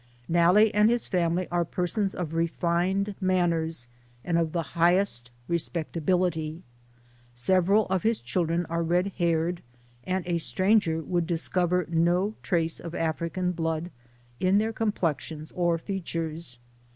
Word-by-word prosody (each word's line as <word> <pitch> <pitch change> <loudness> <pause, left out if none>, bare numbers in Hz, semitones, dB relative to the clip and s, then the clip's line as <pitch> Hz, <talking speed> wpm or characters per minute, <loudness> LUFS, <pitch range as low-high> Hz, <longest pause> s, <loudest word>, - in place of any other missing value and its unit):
Nalle 180 +6 +5
and 210 +1 +5
his 240 0 +1
family 175 -1 0
are 175 0 +2
persons 185 +4 -1
of 165 -3 -4
refined 175 +4 0
manners, 170 -6 +1 0.4
and 175 - 0
of 165 -2 0
the 170 0 -1
highest 170 -8 +2 0.2
respectability. 170 0 -1 0.7
Several 185 - +3
of 190 -1 0
his 225 +3 +1
children 170 +6 -1
are 170 +1 -2
red 175 +4 +1
haired, 170 0 +1 0.4
and 185 -1 -2
a 175 -1 0
stranger 185 -2 +2
would 175 -1 -1
discover 180 +1 0
no 175 +5 +2
trace 165 -2 0
of 170 0 -7
African 170 +3 -1
blood 165 0 -2 0.5
in 185 +2 +3
their 220 +2 +1
complexions 160 - -2
or 175 -2 +1
features. 165 - -4
175 Hz, 125 wpm, -27 LUFS, 165-185 Hz, 0.7 s, Nalle